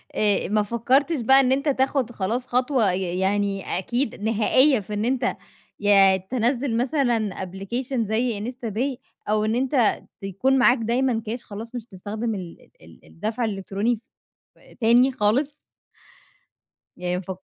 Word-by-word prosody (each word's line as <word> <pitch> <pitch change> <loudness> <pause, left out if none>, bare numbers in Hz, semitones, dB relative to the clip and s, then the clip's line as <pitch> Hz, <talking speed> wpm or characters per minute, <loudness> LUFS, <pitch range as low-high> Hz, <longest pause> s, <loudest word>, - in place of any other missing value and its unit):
آآ، 205 -2 +1
ما 210 0 +2
فكرتش 265 +7 +1
بقى 265 +4 +6
إن 260 -1 +3
أنت 275 +3 +1
تاخد 265 -2 0
خلاص 235 +5 -2
خطوة 250 -5 +2
ي 180 -1 -2
يعني 195 -1 -1
أكيد 240 +4 -2
نهائية 230 +5 +3
في 210 +1 -8
إن 210 +2 -1
أنت 255 +1 0 0.4
يا 195 -2 +5
تنزِّل 240 +5 -1
مثلًا 245 -4 +1 0.2
application 200 +9 -5
زي 225 +1 -1
instapay، 250 +2 -3 0.3
أو 215 0 +2
إن 220 +1 0
أنت 255 -2 +1 0.2
تكون 200 +8 +1
معاك 255 0 +5
دايمًا 235 +1 0
كاش 235 +3 -4
خلاص 225 +4 -9
مش 240 - -4
هتستخدم 215 +3 -4
ال 180 -3 -9
ال 80 +1 -17
الدفع 220 +6 -3
الإلكتروني 200 +3 -1
ف 220 - -16 0.8
تاني 240 +4 +5
خالص. 260 +6 +1 1.4
يعني 180 0 -2
ما - - -4
فك 190 0 -7
225 Hz, 145 wpm, -23 LUFS, 205-255 Hz, 1.4 s, بقى